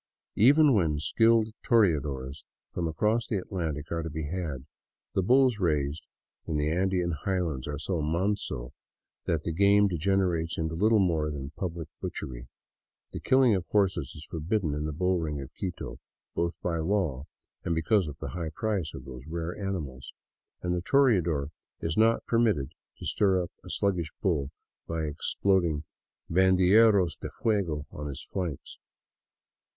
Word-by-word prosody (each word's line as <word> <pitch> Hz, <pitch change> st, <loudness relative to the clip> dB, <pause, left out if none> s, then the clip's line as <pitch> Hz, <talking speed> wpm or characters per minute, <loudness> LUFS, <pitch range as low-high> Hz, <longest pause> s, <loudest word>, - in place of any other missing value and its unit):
Even 145 Hz, +5 st, +6 dB
when 80 Hz, -8 st, +2 dB
skilled 115 Hz, +7 st, +3 dB
toreadors 75 Hz, -, +1 dB, 0.3 s
from 85 Hz, -2 st, -1 dB
across 105 Hz, +9 st, +1 dB
the 105 Hz, -, 0 dB
Atlantic 80 Hz, -6 st, -4 dB
are 85 Hz, 0 st, -1 dB
to 80 Hz, -, -4 dB
be 80 Hz, +1 st, -4 dB
had, 75 Hz, -5 st, -4 dB, 0.5 s
the 95 Hz, -, +2 dB
bulls 125 Hz, +2 st, +4 dB
raised 75 Hz, -3 st, 0 dB, 0.4 s
in 80 Hz, -, -1 dB
the 75 Hz, +1 st, 0 dB
Andean 90 Hz, 0 st, +1 dB
highlands 80 Hz, -4 st, -2 dB
are 75 Hz, 0 st, -3 dB
so 80 Hz, +3 st, -2 dB
manso 80 Hz, -6 st, -1 dB, 0.5 s
that 80 Hz, -2 st, 0 dB
the 85 Hz, -, -2 dB
game 100 Hz, +3 st, +5 dB
degenerates 90 Hz, -2 st, 0 dB
into 80 Hz, 0 st, -2 dB
little 110 Hz, +6 st, +3 dB
more 80 Hz, -6 st, +2 dB
than 70 Hz, -2 st, -5 dB
public 85 Hz, -1 st, -5 dB
butchery. -, -, -5 dB, 0.7 s
The -, -, -4 dB
killing 130 Hz, -3 st, +4 dB
of 95 Hz, -3 st, 0 dB
horses 95 Hz, -8 st, +1 dB
is 75 Hz, -, -10 dB
forbidden 85 Hz, 0 st, -1 dB
in 75 Hz, +1 st, -2 dB
the 75 Hz, -, -2 dB
bull 90 Hz, +4 st, +1 dB
ring 75 Hz, -3 st, -3 dB
of 70 Hz, -, -8 dB
Quito, 90 Hz, -3 st, -5 dB, 0.3 s
both 85 Hz, 0 st, -2 dB
by 85 Hz, -2 st, 0 dB
law 80 Hz, -6 st, 0 dB, 0.4 s
and 85 Hz, -, 0 dB
because 90 Hz, +3 st, +2 dB
of 75 Hz, -1 st, -7 dB
the -, -, -6 dB
high 85 Hz, -3 st, -4 dB
price 95 Hz, -2 st, -2 dB
of -, -, -9 dB
those 65 Hz, +1 st, -9 dB
rare 85 Hz, +1 st, -4 dB
animals, 80 Hz, -10 st, -5 dB, 0.5 s
and 90 Hz, 0 st, 0 dB
the 90 Hz, -, -1 dB
toreador 90 Hz, -, +2 dB, 0.3 s
is 80 Hz, -1 st, -2 dB
not 115 Hz, +1 st, +3 dB
permitted 110 Hz, -, +1 dB, 0.3 s
to -, -, -9 dB
stir 95 Hz, -3 st, +2 dB
up 85 Hz, -, -8 dB
a -, -, -11 dB
sluggish 90 Hz, -6 st, 0 dB
bull 75 Hz, -9 st, 0 dB, 0.4 s
by 80 Hz, -1 st, -2 dB
exploding 80 Hz, +1 st, +1 dB, 0.4 s
handerillos 95 Hz, +1 st, +5 dB
de -, -, -5 dB
fuego 90 Hz, -10 st, 0 dB
on 75 Hz, 0 st, -6 dB
his 70 Hz, -2 st, -6 dB
flanks. 90 Hz, -8 st, -5 dB
85 Hz, 155 wpm, -28 LUFS, 75-100 Hz, 0.7 s, Even